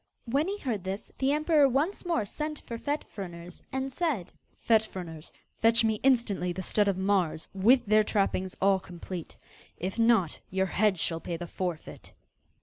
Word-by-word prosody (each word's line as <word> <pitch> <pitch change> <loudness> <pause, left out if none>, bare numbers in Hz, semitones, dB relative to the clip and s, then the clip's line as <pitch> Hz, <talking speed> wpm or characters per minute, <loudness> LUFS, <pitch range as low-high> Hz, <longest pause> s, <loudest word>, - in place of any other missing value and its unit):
When 275 +7 +1
he 400 +1 -2
heard 235 - -3
this, 190 +2 -5
the 270 +1 +2
emperor 300 -1 +4
once 310 +9 -1
more 235 -12 +1
sent 300 +8 -4
for 230 -1 -6
Fet 290 +3 -2
Fruners, 175 -3 -8
and 265 +1 -2
said: 285 - -1 0.2
'Fet 225 -2 +4
Fruners, 170 -7 -8 0.3
fetch 230 +1 +5
me 220 -1 +1
instantly 230 -9 +2
the 185 +2 -5
stud 205 +3 +2
of 195 -2 +1
mares, 190 -5 0
with 240 +6 +4
their 215 +1 +5
trappings 195 -3 0
all 195 0 +4
complete. 180 -1 -8 0.4
If 185 +5 -4
not, 225 -8 +3
your 190 0 +1
head 195 +1 +2
shall 165 +2 -1
pay 170 0 -4
the 175 - -5
forfeit. 175 -2 -5
205 Hz, 170 wpm, -29 LUFS, 185-260 Hz, 0.4 s, fetch